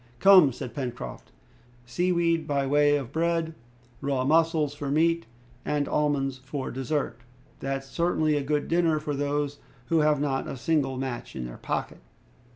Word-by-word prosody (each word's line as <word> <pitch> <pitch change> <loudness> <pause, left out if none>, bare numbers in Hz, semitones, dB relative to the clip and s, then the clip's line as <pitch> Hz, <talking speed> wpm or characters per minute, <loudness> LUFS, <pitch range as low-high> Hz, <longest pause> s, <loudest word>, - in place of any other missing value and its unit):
"Come," 190 -8 +7
said 120 0 -7
Pencroft, 125 -4 -6 0.5
"sea 175 +10 0
weed 170 -2 +1
by 140 -2 0
way 145 +1 +4
of 135 -3 -6
bread, 165 0 0 0.5
raw 135 -2 0
mussels 160 -1 +3
for 145 -1 -5
meat, 165 +2 +2 0.4
and 145 -1 0
almonds 140 -3 0
for 130 +1 -5
dessert, 135 -1 -2 0.4
that's 135 0 -3
certainly 155 0 +1
a 145 - +1
good 145 +1 -1
dinner 165 -2 +2
for 150 -1 -3
those 145 0 -1 0.3
who 165 - +3
have 150 -1 +3
not 140 -2 -1
a - - -5
single 135 0 0
match 130 -2 -5
in 65 - -4
their - - -8
pocket!" - - -3
145 Hz, 160 wpm, -27 LUFS, 135-160 Hz, 0.5 s, Come